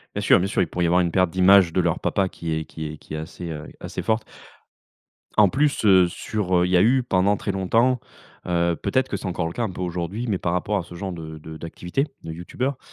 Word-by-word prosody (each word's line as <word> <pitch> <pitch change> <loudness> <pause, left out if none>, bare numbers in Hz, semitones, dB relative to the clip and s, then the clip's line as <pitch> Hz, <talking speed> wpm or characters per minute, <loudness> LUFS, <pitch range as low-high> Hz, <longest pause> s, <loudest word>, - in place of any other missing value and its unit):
Bien - - -1
sûr, - - +5
bien 95 - 0
sûr, 100 - 0
il 90 - +1
pourrait 90 -1 -1
y - - +3
avoir 90 +2 +4
une 85 -1 0
perte 95 0 +3
d'image 95 -1 +5
de 90 - +3
leur 85 -2 0
papa 95 -1 0
qui 85 -2 -4
est 80 0 -2
qui 80 -1 -6
est - - -9
qui - - -12
est - - -3
assez, 85 +2 -7
heu, 75 -2 -6
assez - - -5
forte. 110 0 0 1.1
En 105 -2 +7
plus, 145 +5 +1
heu, 95 -3 +6
sur, 95 +2 -3
heu, 90 - +3
il - - -3
y 90 - +5
a - - +5
eu 130 +5 +4
pendant 100 -3 +2
très 100 - -2
longtemps, 115 +7 +2 0.5
heu 85 -1 +1
peut-être 130 +9 0
que - - -2
c'est - - -9
encore 90 -2 -2
le 85 - -6
cas 120 - -2
un 110 - -1
peu 90 - -7
aujourd'hui, 90 +6 -3
mais 100 -4 0
par 85 -1 -2
rapport 105 +4 0
à 95 - -2
ce 85 - -13
genre 95 +2 -4
de 80 -2 -8
de 80 +1 -9
d'activité, 90 - -3 0.2
de 80 - -6
youtubeur, 125 +11 -3
90 Hz, 265 wpm, -23 LUFS, 85-105 Hz, 1.1 s, En